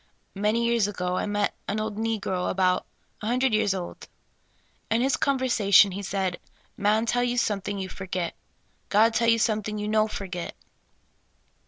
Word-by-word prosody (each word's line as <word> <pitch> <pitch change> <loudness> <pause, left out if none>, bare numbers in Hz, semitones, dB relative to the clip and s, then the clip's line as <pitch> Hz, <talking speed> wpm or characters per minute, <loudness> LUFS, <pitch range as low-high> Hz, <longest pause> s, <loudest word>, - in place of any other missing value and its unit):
Many 210 +4 +1
years 235 -3 +2
ago, 180 -3 -2
I - - -1
met 205 0 0
an 205 +2 -1
old 215 -1 -3
negro, 210 -4 -1
about 185 -1 +1 0.3
a 210 - -4
hun 240 +2 +1
dred 260 -2 +2
years 210 -2 +2
old. 180 -2 -7 0.8
In 225 - +2
his 265 +3 +2
conversation, 230 -8 +4
he 195 +2 -5
said: 190 -2 -2
' - - -35
' - - -42
Man 215 +2 +2
tell 245 +1 0
something 205 -3 -1
you 190 -1 -3
forgit; 185 -2 -4 0.6
God 220 +3 +4
tell 230 0 +2
you 230 - +5
something 215 -1 0
you 210 0 -3
no 215 0 +2
forgit." 185 -5 -5
210 Hz, 170 wpm, -26 LUFS, 195-225 Hz, 0.8 s, you